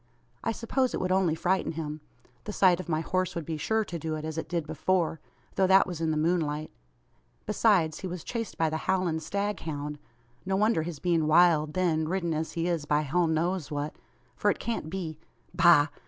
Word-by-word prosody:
I 225 - 0
suppose 250 +3 0
it - - -2
would 185 0 -1
only 185 -4 +2
frighten 180 +1 0
him! 155 -1 -5 0.4
The 210 - -5
sight 185 -3 +4
of 185 - -7
my 155 -1 +1
horse 185 +3 -1
would 170 -2 -4
be 160 - -3
sure 220 +8 0
to 175 -3 -5
do 160 0 -3
it, 155 0 -5
as 160 -1 -4
it 160 - -4
did 170 -3 -1
before; 160 +1 0 0.3
though 190 - +2
that 190 +1 +6
was 175 -3 -6
in 160 - +1
the 155 - 0
moonlight. 155 -2 0 0.7
Besides, 195 -7 +2
he 190 - -4
was 180 -2 -6
chased 230 -2 -4
by 160 -1 +1
the 160 - -1
howling 185 -4 +1
staghound. 160 -7 -3 0.4
No 190 +1 -1
wonder 210 -3 +3
his 165 -1 -5
being 165 -1 +1
wild, 155 -2 +4
then, 165 -4 +1
ridden 170 -1 -1
as 160 +1 -3
he 165 0 -1
is 170 -4 -1
by 150 0 +2
hell 165 +4 +1
knows 165 0 0
what; 145 0 -3 0.4
for - - +1
it - - +1
can't 230 -9 -3
be 165 -4 -5 0.3
Bah! 170 -4 +6
170 Hz, 205 wpm, -28 LUFS, 155-185 Hz, 0.7 s, that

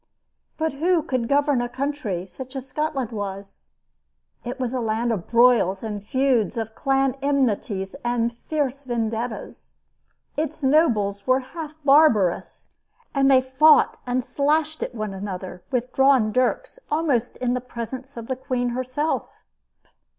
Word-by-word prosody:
But 320 -1 -1
who 330 +3 +2
could 255 -7 -1
govern 285 -2 +2
a 245 - -3
country 255 -9 -3
such 260 +7 -10
as 265 0 -5
Scotland 270 -4 -2
was? 200 -2 -7 0.7
It 250 +2 -5
was 250 -1 -2
a 255 - -1
land 230 +1 0
of 195 -7 -3
broils 230 -5 +4
and 210 -2 -4
feuds, 250 -2 +1
of 220 -1 -3
clan 270 0 +1
enmities 225 -8 0
and 240 -1 0
fierce 280 0 -2
vendettas. 230 -1 -4 0.6
Its 305 -1 -3
nobles 220 -9 +2
were 255 +1 +4
half 305 +3 -8
barbarous, 270 - +3 0.4
and 275 -1 +3
they 260 -1 +6
fought 260 +4 +5
and 250 +1 0
slashed 305 +4 0
at - - -4
one 215 -3 -3
another 190 -2 -6
with 250 -1 -2
drawn 265 -5 +4
dirks 255 - 0
almost 290 -7 0
in 245 -1 0
the 250 - -1
presence 250 +2 -7
of 230 - -6
the 260 - -2
queen 250 -1 -2
herself. 255 +5 -2
255 Hz, 145 wpm, -23 LUFS, 225-275 Hz, 0.7 s, they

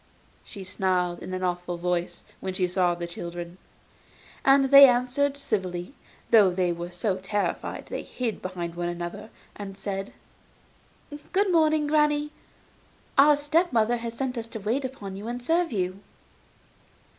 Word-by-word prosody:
she 195 - -9
snarled, 185 -2 0
in - - -8
an 185 0 -3
awful 180 -1 -2
voice, 175 0 -2 0.2
when 190 -1 -4
she 185 - +2
saw 180 -1 +1
the 170 0 -5
children. 170 +1 -7 0.8
And 270 0 +4
they 280 0 +11
answered 255 +3 +1
civilly, 185 -6 -3 0.4
though 215 -5 +7
they 180 -1 0
were 170 +1 -6
so 185 +2 -1
terrified 195 +2 -3
that - - -19
they - - -3
hid 240 -4 -4
behind 175 -2 -5
one 175 0 -3
another, 175 +5 -6 0.3
and 195 -1 -8
said: 195 0 -4 1.2
'Good 395 0 +2
morning, 310 -2 +3
granny; 300 0 +2 0.8
our 295 0 +7
step 310 +5 +1
mother 235 0 +2
has 230 0 -6
sent 255 -1 -2
us 230 - -6
to 225 - -7
wait 230 +7 -1
upon 215 -7 -6
you, 205 +3 -7
and 240 +1 -5
serve 335 +5 +1
you. 185 -2 -2
205 Hz, 155 wpm, -26 LUFS, 180-270 Hz, 1.2 s, they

